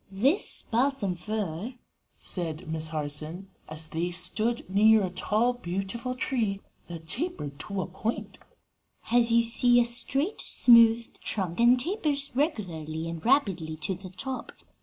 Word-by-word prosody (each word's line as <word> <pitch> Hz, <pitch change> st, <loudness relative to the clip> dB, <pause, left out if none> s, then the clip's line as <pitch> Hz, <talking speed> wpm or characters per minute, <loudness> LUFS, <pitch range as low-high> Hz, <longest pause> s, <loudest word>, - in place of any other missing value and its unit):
"This 265 Hz, -, +1 dB
balsam 235 Hz, -5 st, 0 dB
fir," 200 Hz, +3 st, -4 dB, 0.4 s
said 170 Hz, -1 st, -4 dB
Miss 160 Hz, 0 st, -2 dB
Harson 155 Hz, +4 st, -3 dB, 0.2 s
as 155 Hz, 0 st, -5 dB
they 170 Hz, +2 st, -2 dB
stood 215 Hz, +7 st, 0 dB
near 215 Hz, +3 st, +5 dB
a 185 Hz, -, -2 dB
tall, 215 Hz, +6 st, +1 dB
beautiful 230 Hz, +4 st, -4 dB
tree 225 Hz, -6 st, -1 dB, 0.3 s
that 165 Hz, -2 st, -9 dB
tapered 200 Hz, -, -4 dB
to 195 Hz, +2 st, -2 dB
a -, -, -5 dB
point, 215 Hz, +5 st, -5 dB, 0.6 s
"has, 235 Hz, 0 st, +2 dB
you 235 Hz, 0 st, +5 dB
see, 245 Hz, +1 st, +4 dB
a 240 Hz, -, +4 dB
straight, 270 Hz, -, 0 dB
smooth 230 Hz, -1 st, +5 dB
trunk 185 Hz, -3 st, -3 dB
and 240 Hz, +2 st, +5 dB
tapers 295 Hz, -, -1 dB
regularly 170 Hz, -, -2 dB
and 165 Hz, -1 st, -6 dB
rapidly 195 Hz, -, +1 dB
to 155 Hz, +5 st, -2 dB
the 185 Hz, +1 st, -9 dB
top. 255 Hz, +9 st, -5 dB
205 Hz, 140 wpm, -27 LUFS, 170-245 Hz, 0.6 s, near